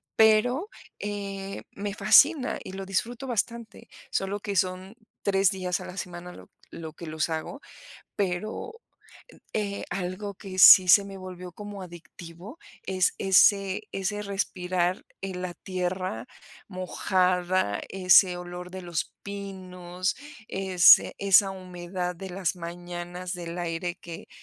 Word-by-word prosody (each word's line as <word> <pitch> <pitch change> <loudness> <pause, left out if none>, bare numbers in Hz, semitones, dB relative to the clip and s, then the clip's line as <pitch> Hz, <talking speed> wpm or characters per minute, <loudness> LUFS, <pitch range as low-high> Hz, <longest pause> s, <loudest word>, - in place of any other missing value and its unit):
pero, 245 - +4 0.3
eh, 200 -1 -5
me 200 0 -5
fascina 285 +1 +5
y 190 - -9
lo 195 0 -6
disfruto 230 +6 -2
bastante, 235 -2 -4 0.2
solo 195 +1 -1
que 200 -1 -4
son 185 +3 -1 0.3
3 195 -1 +3
días 185 -2 -2
a - - -8
la 180 - -9
semana, 180 -1 -7
lo - - -14 0.2
lo 160 -2 -8
que 170 - -10
los 155 +1 -2
hago, 160 - -4 0.5
pero 210 - -3 0.7
en 205 -2 -1
eh, - - -5
algo 195 +2 -4
que 190 -1 -9
sí 185 +1 +10
se 200 +2 +7
me 195 -1 -9
volvió 185 -1 -8
como 205 -1 -8
adictivo, 175 - -11 0.3
es 185 -1 +2
ese 195 0 +4
ese 205 +2 -2
respirar 185 -2 -1 0.2
en 185 -2 -5
la 180 -1 -4
tierra 185 -10 -3 0.4
mojada, 185 - 0
ese 185 -1 +5
olor 180 0 -8
de 185 0 -7
los 175 -3 -3
pinos, 185 -2 -4 0.3
ese 190 -3 +5
esa 195 0 +5
humedad 180 -1 -5
de 190 +1 -8
las 185 -1 -1
mañanas, 175 +1 -6
del 170 0 -6
aire 175 +1 -3
que 170 -1 -10
185 Hz, 135 wpm, -27 LUFS, 180-200 Hz, 0.7 s, sí